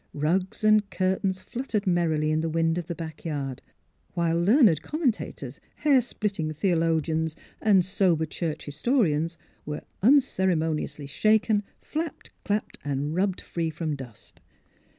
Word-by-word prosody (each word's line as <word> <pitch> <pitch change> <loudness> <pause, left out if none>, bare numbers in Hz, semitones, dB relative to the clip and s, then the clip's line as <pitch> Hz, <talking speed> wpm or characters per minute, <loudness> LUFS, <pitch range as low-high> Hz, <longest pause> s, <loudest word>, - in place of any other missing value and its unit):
Rugs 180 +8 0
and 215 -1 +4
curtains 190 0 0
fluttered 235 -4 -3
merrily 160 -4 +1
in 155 0 +1
the 165 - -1
wind 165 +1 +1
of 170 - -6
the 170 - -4
back 160 -2 -7
yard; 140 -5 -3 0.5
while 170 -1 +1
learned 200 - +5
commentators, 295 - -2 0.2
hairsplitting 215 - +1
theo 175 +2 +1
logians, 160 -1 0 0.3
and 195 -5 +4
sober 180 -4 +2
church 160 0 -4
historians 165 - +1 0.3
were 150 0 -5 0.2
uncere 200 - +4
moniously 155 -2 -2
shaken, 215 +6 +3 0.2
flapped, 315 0 -5
clapped, 210 0 -2
and 145 +1 -2
rubbed 190 0 0
free 165 -2 -2
from 155 -1 -3
dust. 125 -6 -12
170 Hz, 130 wpm, -26 LUFS, 155-205 Hz, 0.5 s, learned